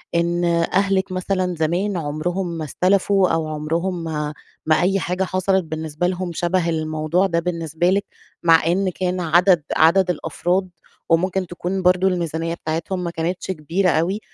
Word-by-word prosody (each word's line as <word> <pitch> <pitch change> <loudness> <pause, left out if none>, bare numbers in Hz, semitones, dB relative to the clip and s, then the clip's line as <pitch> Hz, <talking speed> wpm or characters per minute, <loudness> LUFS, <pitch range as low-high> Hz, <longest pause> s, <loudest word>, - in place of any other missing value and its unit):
إن 170 +1 +1 0.3
أهلِك 195 0 +1
مثلًا 185 -1 -1
زمان 175 +5 0
عمرهم 170 +5 -2
ما 160 - -4
استلفوا 190 +4 +2
أو 165 -1 0
عمرهم 165 +4 -2
ما 150 -2 -3 0.3
ما 155 +2 +3
أي 195 +2 +2
حاجة 180 +2 -1
حصلت 185 0 +1
بالنسبة 160 +1 -3
لهم 180 -1 -3
شَبه 175 +1 0
الموضوع 155 +2 0
ده 170 -3 +1
بالنسبة 170 0 -1
لِك، 200 +2 +1 0.4
مع 165 -2 +5
إن 190 +2 +1
كان 180 0 -2
عدد 175 0 +4
عدد 180 +3 +4
الأفراد 180 +2 -1 0.4
وممكن 185 +2 +1
تكون 180 +2 -3
برضه 185 +1 +3
الميزانيّة 165 -2 -1
بتاعتهم 170 +3 -3
ما 170 - -3
كانتش 170 +3 -3
كبيرة 175 +3 0
أوي. 175 +5 +1
175 Hz, 150 wpm, -21 LUFS, 165-185 Hz, 0.4 s, مع